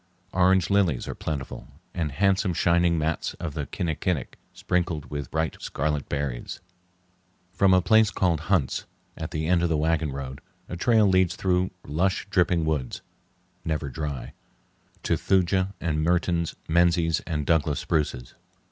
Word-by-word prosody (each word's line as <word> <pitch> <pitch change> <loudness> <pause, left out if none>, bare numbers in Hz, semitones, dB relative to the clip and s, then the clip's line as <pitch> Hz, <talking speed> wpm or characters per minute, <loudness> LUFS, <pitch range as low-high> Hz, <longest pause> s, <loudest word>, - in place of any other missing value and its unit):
Orange 95 0 +3
lilies 95 -10 +2
are - - -3
plentiful, 70 -4 -5 0.3
and 80 -4 -2
handsome 95 +2 +2
shining 85 0 +3
mats 80 0 -1
of 85 -4 -5
the 75 -3 -4
kinnikinic, 85 -4 -2 0.2
sprinkled 85 -4 -2
with 70 -3 -4
bright 80 0 -2
scarlet 75 0 -2
berries. 70 -4 -3 0.9
From 100 -1 +4
a 90 -1 +5
place 110 +2 +5
called 85 -5 +1
"Hunt's," 90 -10 +1 0.3
at 80 0 -5
the 80 -1 -3
end 85 +1 +3
of 85 - +1
the 80 - +1
wagon 80 -1 +1
road, 65 -1 -6 0.3
a - - -5
trail 110 +4 +3
leads 95 -2 +3
through 90 0 +1 0.2
lush, 90 +6 0
dripping 90 -3 +2
woods 75 -6 -2 0.6
(never 75 -3 -2
dry) 75 -1 -5 0.7
to - - +1
Thuja 95 +1 +1
and 80 -2 -1
Mertens, 85 0 +1
Menzies, 85 -1 +3
and 75 -4 -2
Douglas 75 -3 +2
spruces. 75 -6 -2
85 Hz, 145 wpm, -26 LUFS, 75-90 Hz, 0.9 s, a